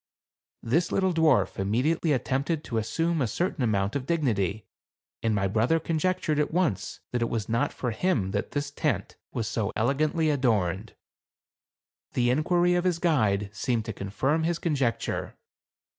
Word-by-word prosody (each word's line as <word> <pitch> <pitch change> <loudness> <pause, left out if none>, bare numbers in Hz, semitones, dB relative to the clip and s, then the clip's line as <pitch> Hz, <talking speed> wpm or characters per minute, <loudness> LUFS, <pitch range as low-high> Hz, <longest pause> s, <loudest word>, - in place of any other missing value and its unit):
This 165 +9 +1
little 190 -2 +2
dwarf 160 -10 +3
im 95 0 -1
mediately 155 +8 +1
attempted 140 +4 0
to 115 - -2
assume 165 +9 0
a 125 - +2
certain 170 - -1
amount 100 -2 +1
of 135 -2 -3
dignity, 110 - 0 0.6
and 110 -2 +1
my 100 -1 +1
brother 115 +11 +2
conjectured 165 -1 0
at 150 - +1
once 155 - -1
that 120 - -1
it 115 - +1
was 110 -3 -2
not 115 +1 +1
for 125 - -3
him 110 - 0
that 100 0 -2
the 145 - -1
tent 145 0 -2 0.2
was 115 - -2
so 110 -3 -1
elegantly 150 +7 +1
adorned. 110 -7 0 1.2
The 120 -1 +2
inquiry 175 +6 +2
of 175 0 +1
his 180 -2 +1
guide 110 - +1
seemed 115 0 -1
to 110 - -4
confirm 130 +11 -1
his 165 +1 0
conjecture. 140 - -1
130 Hz, 160 wpm, -27 LUFS, 110-160 Hz, 1.2 s, dwarf